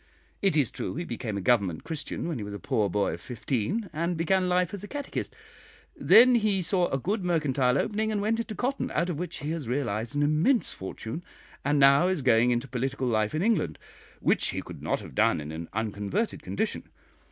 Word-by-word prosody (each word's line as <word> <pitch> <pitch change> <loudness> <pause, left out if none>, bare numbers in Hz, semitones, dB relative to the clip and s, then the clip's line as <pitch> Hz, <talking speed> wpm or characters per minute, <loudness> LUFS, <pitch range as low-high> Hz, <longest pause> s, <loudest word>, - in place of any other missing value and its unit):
It 195 -6 +2
is 140 -6 +2
true - - -4
he 170 - -3
became 120 -8 -4
a - - -3
'Government 95 -7 +2
Christian' 160 0 -4
when 160 -7 -3
he - - -4
was 100 0 -6
a - - -6
poor 105 0 0
boy 100 +2 0
of - - -7
fifteen, 130 - -2
and 170 +2 -1
began 185 +2 +2
life 180 0 +1
as 200 -1 -5
a - - -6
catechist; 285 +2 -5 0.6
then 250 +3 +7
he 210 -5 +2
saw 180 0 +2
a 135 - -1
good 195 - -2
mercantile 140 -7 +2
opening, 220 +6 0
and 210 - 0
went 220 +3 0
into 230 -2 -4
cotton, 265 +5 -1
out 170 +3 +1
of 155 - -4
which 180 - -5
he 150 +2 -3
has 160 -6 -4
realised 120 -1 -2
an 145 - +2
immense 155 - +2
fortune, 110 - -6 0.4
and 145 +1 +2
now 140 +5 +6
is 185 -7 -1
going 120 -1 +4
into 120 +2 0
political 130 +1 -2
life 110 +1 +1
in 160 - 0
England, 185 - +1 0.4
which - - +2
he - - -3
could - - -10
not - - -1
have - - -10
done - - +3
in 75 +1 -6
an 80 +1 -6
unconverted 110 - -2
condition. 220 +1 -3
150 Hz, 210 wpm, -27 LUFS, 120-190 Hz, 0.6 s, then